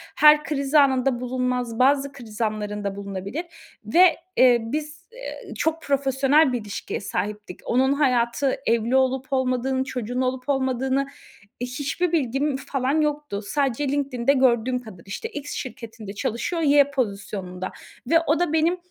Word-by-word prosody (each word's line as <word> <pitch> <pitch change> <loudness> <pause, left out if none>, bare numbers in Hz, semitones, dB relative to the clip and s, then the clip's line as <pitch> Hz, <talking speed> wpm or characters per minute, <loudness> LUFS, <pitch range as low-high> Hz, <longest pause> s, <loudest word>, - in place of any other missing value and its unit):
Her 300 0 +7
kriz 280 -1 -3
anında 265 -3 +4
bulunmaz, 250 -2 -2
bazı 275 +1 +3
kriz 235 -5 -10
anlarında 210 -2 -2
bulunabilir 200 - -5 0.4
ve, 345 - +5 0.2
eee, 250 -2 +7
biz, 300 +7 -5
eee, - - -8
çok 320 0 0
profesyonel 275 +1 +3
bir 245 - -1
ilişkiye 205 -1 -5
sahiptik. 210 -1 -4
Onun 265 +3 +2
hayatı, 255 -1 +1
evli 230 +2 +1
olup 265 +1 +1
olmadığını, 260 0 +1
çocuğun 250 -1 -3
olup 255 +1 -2
olmadığını, 265 0 0 0.5
hiçbir 285 +7 -2
bilgim 275 -2 0
falan 270 +3 0
yoktu. 295 -8 -2
Sadece 275 +4 -1
LinkedIn'de 275 -2 +1
gördüğüm 250 -2 +2
kadar, 190 -8 -12
işte, 205 - -5
X 290 -8 -7
şirketinde 225 -5 -7
çalışıyor, 235 - -2
Y 285 -2 +5
pozisyonunda 200 -7 -3 0.4
ve 330 - +6
o 310 - +3
da 350 -3 0
benim, 325 +3 +2
260 Hz, 135 wpm, -24 LUFS, 235-285 Hz, 0.5 s, Her